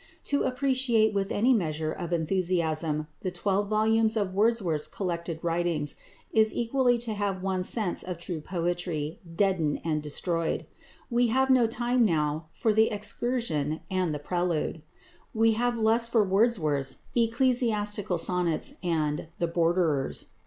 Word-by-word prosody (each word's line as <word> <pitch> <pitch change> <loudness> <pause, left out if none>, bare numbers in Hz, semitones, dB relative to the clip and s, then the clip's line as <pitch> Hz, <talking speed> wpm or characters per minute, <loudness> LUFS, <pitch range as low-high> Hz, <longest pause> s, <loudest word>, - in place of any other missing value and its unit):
To 285 - 0
appreciate 255 -4 +2
with 195 -1 -1
any 245 +5 +3
measure 155 -7 -1
of 175 0 -5
enthusiasm 165 -3 0 0.2
the 185 - -2
twelve 195 +3 0
volumes 220 +1 +3
of 200 -3 -1
Wordsworth's 195 -7 +1
collected 170 -3 -4
writings 170 -3 0 0.4
is 220 -1 +4
equally 245 +1 +2
to 230 -2 -2
have 200 -2 -2
one's 185 -1 0
sense 210 -7 -1
of 180 -2 -5
true 170 -2 -5
poetry 170 -1 -3 0.2
deadened 180 -6 +1
and 155 -2 0
destroyed. 165 +3 -2 0.5
We 240 0 +3
have 265 +3 +2
no 250 -3 +5
time 240 +2 +1
now 155 -4 0
for 220 +4 0
"The 220 +1 +4
Excursion" 210 - -2
and 185 -3 0
"The 150 - -2
Prelude." 170 0 -2 0.5
We 225 +1 +4
have 240 +2 0
less 225 +1 +3
for 230 -2 +3
Wordsworth's 185 - +1
"Ecclesiastical 230 -5 +1
Sonnets" 180 - 0
and 155 -3 -1
"The 170 - 0
Borderers." 165 -4 0
190 Hz, 140 wpm, -27 LUFS, 165-225 Hz, 0.5 s, no